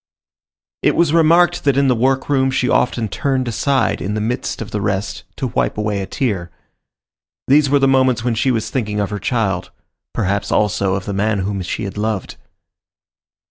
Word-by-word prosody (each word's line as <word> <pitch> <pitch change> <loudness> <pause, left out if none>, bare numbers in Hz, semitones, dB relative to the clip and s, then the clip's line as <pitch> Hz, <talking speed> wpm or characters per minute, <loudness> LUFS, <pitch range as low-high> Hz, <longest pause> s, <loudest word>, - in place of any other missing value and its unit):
It - - +2
was 165 -3 +2
remarked 170 +1 +4
that 140 -2 +2
in 140 0 +3
the 130 - +4
workroom 130 +2 +1
she 130 -1 0
often 120 -2 +1
turned 130 +3 -1
aside, 135 +4 0
in 100 +3 -2
the - - -1
midst 115 +4 -2
of 115 - -6
the 105 - -2
rest, 100 0 -2
to 135 - -3
wipe - - 0
away 105 -2 -1
a 95 - -5
tear. 100 -10 -2 1.0
These 140 +1 +4
were 145 - +4
the 135 -1 +3
moments 130 -3 +3
when 120 -1 0
she 115 +4 +1
was 115 -3 -1
thinking 105 -5 -2
of 100 0 -1
her 105 - -3
child; 100 -5 -1 0.4
perhaps, 100 +2 -1
also, 100 -2 +1
of 95 0 -4
the 100 - -3
man 100 +1 0
whom 100 0 -2
she 90 +4 -4
had 100 +1 -5
loved. 105 -3 -3
110 Hz, 185 wpm, -18 LUFS, 100-135 Hz, 1.0 s, remarked